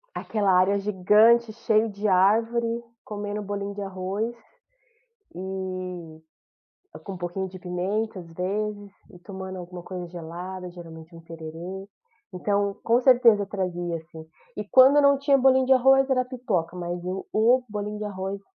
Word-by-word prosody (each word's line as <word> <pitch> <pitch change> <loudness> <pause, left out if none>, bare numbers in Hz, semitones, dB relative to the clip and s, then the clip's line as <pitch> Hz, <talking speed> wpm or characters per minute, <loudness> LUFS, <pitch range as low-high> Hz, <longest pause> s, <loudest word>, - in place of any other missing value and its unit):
Aquela 205 -3 0
área 195 +2 +3
gigante, 210 +4 +4
cheio 220 0 +1
de 205 +1 -3
árvore, 230 +5 +2 0.2
comendo 205 0 -5
bolinho 200 0 -4
de 205 - -6
arroz, 195 +3 -3 1.0
e 185 -4 -7 0.6
com 195 - -7
um - - -7
pouquinho 180 +2 -4
de 185 0 -11
pimenta, 190 +4 -2
às 170 -2 -12
vezes, 205 +3 -3 0.2
e 180 - -15
tomando 190 0 -8
alguma 175 0 -9
coisa 180 -1 -6
gelada, 180 +2 -7
geralmente 165 -1 -12
um 165 - -11
tererê. 165 +3 -8 0.5
Então, 200 +2 0
com 235 +2 +2
certeza 240 -5 +5
trazia, 175 -4 -3
assim. 160 0 -12 0.3
E 210 - -4
quando 260 +2 +7
eu 290 - +6
não 280 0 +5
tinha 280 0 +3
bolinho 260 0 +4
de 265 - +5
arroz, 270 +1 +4
era 255 -1 +2
pipoca, 215 -10 -3
mas 175 0 -4
o 185 +2 -5
o 235 +4 +4
bolinho 210 0 -4
de 210 - -5
arroz 195 -1 -4
195 Hz, 150 wpm, -25 LUFS, 180-220 Hz, 1.0 s, quando